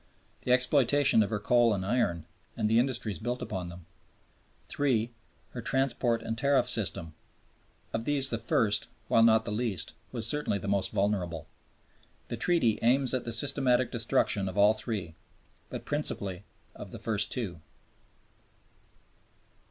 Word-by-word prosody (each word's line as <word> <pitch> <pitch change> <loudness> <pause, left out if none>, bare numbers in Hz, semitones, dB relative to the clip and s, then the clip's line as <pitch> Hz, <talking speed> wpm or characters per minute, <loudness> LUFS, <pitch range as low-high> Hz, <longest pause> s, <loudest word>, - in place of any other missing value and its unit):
The 125 - +1
exploitation 130 0 +3
of 105 - 0
her 105 - -1
coal 115 +1 +3
and 95 -1 -4
iron 90 -8 0 0.3
and 110 -2 +1
the 110 +2 +3
industries 120 -5 -1
built 120 +3 -3
upon 90 -3 -5
them; 85 -1 -11 0.9
III. 120 -5 +1 0.4
Her - - -6
transport 130 -3 0
and 115 - -3
tariff 140 +2 +2
system. 100 -9 0 0.8
Of 115 0 -2
these 140 -1 +2
the 115 - -1
first, 105 -2 +1 0.2
while 115 - +4
not 110 -1 +5
the - - -1
least 105 -6 -1
important, - - -33
was 115 -3 0
certainly 145 -5 -1
the 100 - -7
most 100 -1 0
vulnerable. 95 -6 -1 0.8
The - - -4
Treaty 145 -12 +2
aims 130 +2 +3
at 130 - -1
the 120 - -3
systematic 130 0 +1
destruction 110 -4 +1
of 95 - -8
all 105 +1 +6
three, 105 -6 -4 0.6
but - - -7
principally 100 -10 -2 0.3
of - - -10
the - - -9
first 105 -3 -1
two. 95 -10 -4
115 Hz, 150 wpm, -29 LUFS, 100-125 Hz, 0.9 s, all